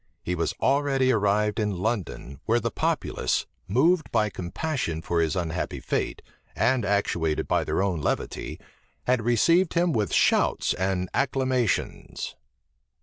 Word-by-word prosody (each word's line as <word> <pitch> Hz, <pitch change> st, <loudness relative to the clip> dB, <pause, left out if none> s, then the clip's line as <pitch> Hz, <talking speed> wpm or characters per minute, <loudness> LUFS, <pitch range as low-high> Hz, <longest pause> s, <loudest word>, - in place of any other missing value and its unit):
He 90 Hz, -, -2 dB
was 85 Hz, -2 st, -1 dB
already 135 Hz, -1 st, +2 dB
arrived 105 Hz, 0 st, +1 dB
in 105 Hz, -3 st, -1 dB
London, 95 Hz, -, -3 dB
where 115 Hz, +1 st, +3 dB
the 115 Hz, 0 st, -2 dB
populace, -, -, 0 dB, 0.2 s
moved 155 Hz, -, +2 dB
by 105 Hz, -1 st, +2 dB
compassion 90 Hz, -, -3 dB
for 85 Hz, -1 st, +1 dB
his 80 Hz, +2 st, 0 dB
unhappy 85 Hz, -3 st, -2 dB
fate, -, -, -2 dB, 0.3 s
and 120 Hz, +1 st, +2 dB
actuated 90 Hz, -6 st, 0 dB
by -, -, +2 dB
their 95 Hz, -, 0 dB
own 90 Hz, -6 st, -1 dB
levity, -, -, -3 dB, 0.4 s
had 125 Hz, -2 st, +2 dB
received 165 Hz, -, +3 dB
him 170 Hz, -1 st, +2 dB
with 105 Hz, -4 st, 0 dB
shouts -, -, +3 dB
and 95 Hz, 0 st, -1 dB
acclamations. 130 Hz, -4 st, -1 dB
105 Hz, 135 wpm, -26 LUFS, 90-130 Hz, 0.4 s, where